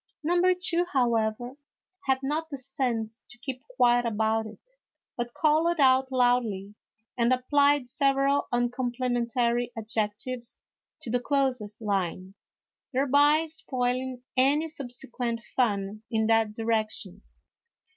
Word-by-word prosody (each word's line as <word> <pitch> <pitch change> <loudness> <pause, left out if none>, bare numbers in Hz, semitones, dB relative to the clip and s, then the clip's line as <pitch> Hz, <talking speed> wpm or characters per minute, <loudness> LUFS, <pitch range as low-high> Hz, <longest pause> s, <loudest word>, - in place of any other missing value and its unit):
Number 355 +3 +3
two, 355 -1 +1
however, 240 0 0 0.5
had 265 0 +1
not 310 +4 -2
the 280 - -5
sense 240 -4 -3
to 245 - -13
keep 255 +1 -6
quiet 245 - +4
about 220 -1 0
it, 220 - -13 0.4
but 240 0 -4
called 315 +2 +2
out 265 -1 +4
loudly, 245 -6 +1 0.4
and 235 0 +2
applied 285 +1 +3
several 275 +1 +1
uncomplimentary 240 -1 0
adjectives 225 +3 -3 0.5
to 230 - -5
the 245 - +2
clothes 250 -6 -1
line, 190 -3 -2 0.6
thereby 285 +4 +4
spoiling 255 -4 -3
any 280 +5 +3
subsequent 245 -4 -4
fun 205 -4 0
in 220 -1 +1
that 225 -1 +2
direction. 215 -4 -2
245 Hz, 110 wpm, -27 LUFS, 225-275 Hz, 0.6 s, quiet